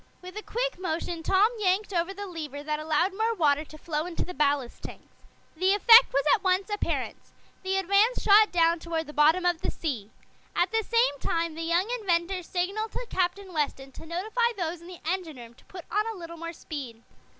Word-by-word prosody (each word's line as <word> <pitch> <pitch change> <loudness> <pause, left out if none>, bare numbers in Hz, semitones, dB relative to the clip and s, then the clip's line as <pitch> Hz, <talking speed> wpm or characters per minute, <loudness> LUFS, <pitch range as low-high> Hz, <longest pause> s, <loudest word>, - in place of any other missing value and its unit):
With 365 +1 -10
a 425 - -4
quick - - -3
motion 340 -1 -3
Tom 385 +6 +3
yanked 400 +1 +1
over 345 +1 0
the 405 +1 -7
lever 305 -6 -7
that 300 0 -2
allowed 315 +5 +1
more 450 +2 0
water 300 -5 +2
to 310 - -13
flow 310 0 -3
into 350 - -3
the 360 - -7
ballast 280 -3 0
tanks. - - -11 0.4
The 375 +4 +3
effect 460 +4 +8
was 275 - +1
at 400 - +1
once 375 +2 +1
apparent. 415 - -2 0.4
The 380 0 -1
Advance 400 +6 +3
shot 425 +1 +5
down 335 -1 +3
toward 325 -1 -3
the 300 - -10
bottom 315 +5 +4
of 350 -1 +1
the - - -2
sea. 240 -11 -4 0.5
At 355 +1 +1
the 445 0 +1
same 460 - +1
time 330 +2 -1
the 325 - -7
young 340 +4 +1
inventor 365 -2 0
signaled 385 +6 -3
to - - -5
Captain 375 +1 -1
Weston 280 -3 -2
to 320 - -12
notify 440 +8 0
those 340 -2 -3
in 340 - -13
the 360 -1 -11
engine 335 -4 -3
room 235 -1 -11
to - - -23
put 360 -2 -10
on 425 +2 +1
a 450 -2 -5
little 335 -1 -8
more 335 0 -6
speed. 265 -8 -8
350 Hz, 205 wpm, -27 LUFS, 315-395 Hz, 0.5 s, effect